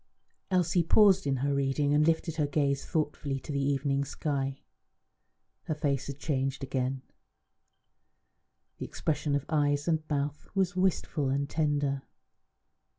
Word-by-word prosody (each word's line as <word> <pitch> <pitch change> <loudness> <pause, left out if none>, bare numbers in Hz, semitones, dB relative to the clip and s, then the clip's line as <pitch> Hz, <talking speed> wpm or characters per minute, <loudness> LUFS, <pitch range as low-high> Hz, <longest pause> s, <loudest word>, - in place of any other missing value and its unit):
Elsie 180 -2 +2
paused 190 0 +5
in 135 - +2
her 140 - +1
reading 140 +1 +1
and 150 +1 +4
lifted 165 0 0
her 150 -2 +2
gaze 140 -1 0
thoughtfully 145 -3 -2
to 140 - -8
the 140 -1 0
evening 140 0 +1
sky. 140 -1 -2 1.1
Her 155 - -2
face 140 -3 -1
had 140 -1 -5
changed 135 -2 -2
again; 130 0 -2 1.8
the - - -3
expression 150 -2 -1
of 140 0 -1
eyes 145 -1 +1
and 160 -2 +2
mouth 145 0 -2
was 185 -2 +1
wistful 180 -6 +1
and 140 +1 0
tender. 145 -2 0
145 Hz, 135 wpm, -29 LUFS, 140-155 Hz, 1.8 s, paused